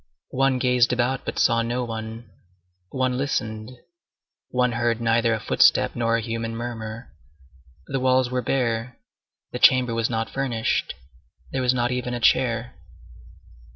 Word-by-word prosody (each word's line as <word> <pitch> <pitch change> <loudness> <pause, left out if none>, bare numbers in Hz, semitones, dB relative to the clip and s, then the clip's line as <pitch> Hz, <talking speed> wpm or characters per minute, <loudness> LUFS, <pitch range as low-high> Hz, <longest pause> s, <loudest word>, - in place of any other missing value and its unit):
One 135 0 +2
gazed 125 -1 +3
about, 125 +2 0
but - - -4
saw 115 0 +3
no 120 +2 -2
one; 115 0 -6 0.6
one 130 -1 -1
listened, 110 -4 -3 0.8
one 125 -1 +1
heard 120 0 0
neither 115 0 +2
a - - -4
footstep - - +3
nor 115 -1 +1
a - - -2
human 115 0 -4
murmur. 115 0 -6 0.7
The 135 - -2
walls 130 -1 +2
were 125 0 0
bare, 120 -2 -1 0.5
the - - -5
chamber 125 -2 +5
was 115 -1 0
not 115 -1 -2
furnished; 125 -5 -1 0.6
there 135 - -1
was 125 0 +2
not 120 0 0
even 125 -1 -2
a - - -3
chair. 120 0 +2
120 Hz, 145 wpm, -24 LUFS, 115-125 Hz, 0.8 s, chamber